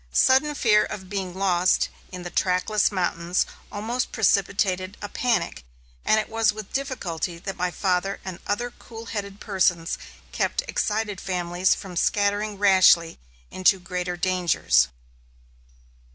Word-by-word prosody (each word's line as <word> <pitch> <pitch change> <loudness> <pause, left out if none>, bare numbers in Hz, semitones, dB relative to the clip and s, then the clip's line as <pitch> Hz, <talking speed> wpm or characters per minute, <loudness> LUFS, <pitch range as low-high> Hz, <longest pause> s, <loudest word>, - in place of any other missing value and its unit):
Sudden 265 - +4
fear 210 -5 +4
of 190 -2 -7
being 190 -3 -3
lost 185 -2 +2 0.2
in 180 -1 -7
the 175 - -6
trackless 185 +4 +1
mountains 175 -2 0 0.3
almost 230 +5 -2
precipitated 195 -2 +1
a 205 - -5
panic, 235 - -1 0.4
and 220 - +3
it 215 - -3
was 225 -1 +2
with 215 -2 -9
difficulty 185 - -3
that 190 +3 -6
my 180 0 -1
father 185 +1 -1
and 185 -2 -6
other 240 +4 -1
cool 225 -1 -11
headed 200 -3 -5
persons 180 -4 0 0.3
kept - - -1
excited 210 - -1
families 180 0 +1
from 185 -2 -9
scattering 205 +3 +1
rashly 185 -4 +5 0.3
into 185 +1 +3
greater 180 -1 -4
dangers. 175 - +2
195 Hz, 130 wpm, -24 LUFS, 180-210 Hz, 0.4 s, rashly